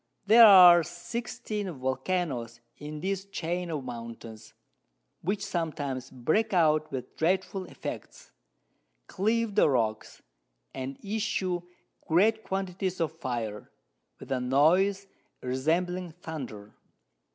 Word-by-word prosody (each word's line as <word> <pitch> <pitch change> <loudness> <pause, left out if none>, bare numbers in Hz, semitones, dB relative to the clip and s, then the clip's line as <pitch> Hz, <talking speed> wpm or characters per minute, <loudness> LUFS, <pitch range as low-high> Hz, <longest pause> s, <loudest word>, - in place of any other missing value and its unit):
There 225 +2 +9
are 180 -3 +9
16 205 - -5
Vulcanos 130 -3 -2 0.2
in 150 0 -7
this 195 +1 -2
Chain 175 -2 -3
of 150 -4 -3
Mountains, 115 -2 -9 0.7
which 200 +3 -2
sometimes 145 -8 -3
break 185 - 0
out 155 -2 +3
with 125 -1 -6
dreadful 185 +3 0
Effects, - - -8 0.7
cleave 220 - 0
the 195 - +4
Rocks, 110 -5 -2 0.5
and 130 +1 -5
issue 195 -4 -1 0.5
great 220 +7 +3
Quantities 190 -1 -3
of 165 -2 0
Fire, 120 -9 -5 0.5
with - - -11
a 130 - +1
Noise 175 +10 +3 0.3
resembling 165 +7 -1
Thunder. 135 -12 -8
170 Hz, 105 wpm, -28 LUFS, 130-195 Hz, 0.7 s, There